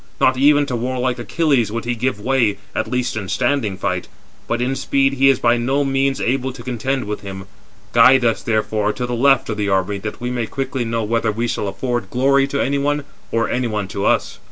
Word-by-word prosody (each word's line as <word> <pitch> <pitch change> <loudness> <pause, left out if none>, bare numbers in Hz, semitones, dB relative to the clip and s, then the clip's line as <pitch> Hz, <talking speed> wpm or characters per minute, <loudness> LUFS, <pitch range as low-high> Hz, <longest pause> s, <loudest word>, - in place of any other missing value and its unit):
Not 130 - +4
even 145 +2 +4
to 135 -3 -3
warlike 125 +1 -1
Achilles 130 - +1
would 115 +1 -4
he 120 - 0
give 120 -2 -2
way, 115 -3 +1 0.2
at - - -2
least 125 -2 -1
in 100 -4 -4
standing 120 -6 0
fight; 90 -2 -2 0.4
but 120 - -1
in 125 +2 0
speed 135 0 +1
he 135 0 +4
is 135 - +4
by 120 0 +2
no 135 +4 +1
means 135 0 0
able 130 +1 0
to 125 -2 -10
contend 130 +2 -2
with 105 0 -4
him. 95 -1 -7 0.5
Guide 125 +2 +6
us, 115 -1 +1
therefore, 110 -1 0
to 125 - -3
the 125 - -4
left 135 +2 +3
of 110 - -2
the 105 -1 -1
army 95 +1 0
that 105 +2 -6
we 120 0 -3
may 120 -2 -2
quickly 135 -1 -3
know 115 0 -1
whether 115 +1 0
we 115 +3 -2
shall 105 - -2
afford 120 +1 -3
glory 135 +3 +3
to 140 0 -2
any 140 +1 +1
one, 145 +1 0 0.3
or 115 0 +1
any 125 0 -1
one 105 -3 -2
to 100 -1 -4
us." - - +1
120 Hz, 225 wpm, -19 LUFS, 110-135 Hz, 0.5 s, Guide